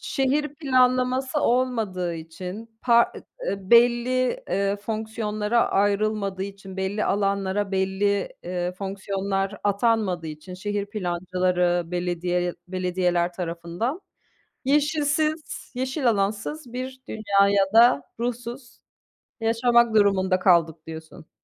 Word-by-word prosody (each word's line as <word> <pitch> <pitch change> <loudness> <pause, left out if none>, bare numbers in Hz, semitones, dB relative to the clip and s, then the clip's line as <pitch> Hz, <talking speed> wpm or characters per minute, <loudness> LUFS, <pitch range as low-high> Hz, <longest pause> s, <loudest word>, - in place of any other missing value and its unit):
Şehir 280 +2 0
planlaması 255 -1 +2
olmadığı 225 -10 0
için, 185 +8 -8
pa 235 -1 +4 0.3
eee, 200 - -1
belli, 245 - +4
eee, 200 0 +1
fonksiyonlara 215 +1 -1
ayrılmadığı 200 -1 +1
için 195 -1 -8
belli 190 +2 -1
alanlara, 200 0 0
belli, 195 +1 +1
eee, 180 0 -3
fonksiyonlar 195 +1 -3
atanmadığı 205 -4 +1
için, 155 +4 -8
şehir 205 +2 -3
plancıları, 180 -2 0
belediye 175 0 -1
belediyeler 180 -1 0
tarafından, 175 - -3 0.7
yeşilsiz, 305 +2 0
yeşil 260 0 0
alansız 220 +6 -2
bir 260 +1 -5
dünyaya 200 -2 +3
da 230 -10 +6 0.2
ruhsuz 240 +1 -5 0.6
yaşamak 230 0 +3
durumunda 190 -3 +3
kaldık 165 -4 +3
diyorsun. 160 0 -10
200 Hz, 95 wpm, -24 LUFS, 185-240 Hz, 0.7 s, da